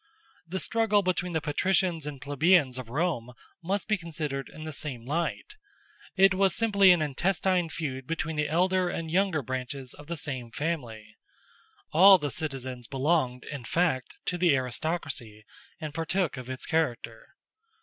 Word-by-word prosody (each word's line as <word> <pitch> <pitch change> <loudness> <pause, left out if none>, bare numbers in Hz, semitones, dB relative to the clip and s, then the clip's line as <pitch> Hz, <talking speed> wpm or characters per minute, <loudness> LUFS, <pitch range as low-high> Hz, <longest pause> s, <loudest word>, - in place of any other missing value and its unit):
The 190 +3 -3
struggle 215 +1 +2
between 180 -1 -1
the 160 - 0
patricians 165 +1 +1
and 145 -2 -6
plebeians 145 -1 +3
of 120 -3 -8
Rome 135 -4 -1 0.3
must 190 +4 -2
be 215 -2 +1
considered 155 -5 -4
in 155 - -10
the 155 -1 -5
same 130 -5 -5
light: 170 - -3 0.6
it 195 0 +6
was 190 -1 +2
simply 200 -4 +4
an 175 -3 +5
intestine 180 +4 0
feud 130 -5 -4
between 160 -1 -2
the 150 -1 0
elder 185 +2 +2
and 165 -2 -4
younger 180 -4 +1
branches 130 +1 -5
of 145 - -13
the 170 0 -4
same 130 -5 -4
family. 115 -7 -4 0.7
All 190 +4 +8
the 145 -5 -3
citizens 130 -5 -5
belonged, 135 -2 0
in 145 -4 -6
fact, 130 -1 0
to 180 - -2
the 170 -5 +4
aristocracy, 130 -4 -3 0.3
and 155 -3 -5
partook 165 +1 0
of 130 -1 -8
its 130 -1 -5
character. 120 -8 -2
155 Hz, 155 wpm, -28 LUFS, 130-180 Hz, 0.7 s, All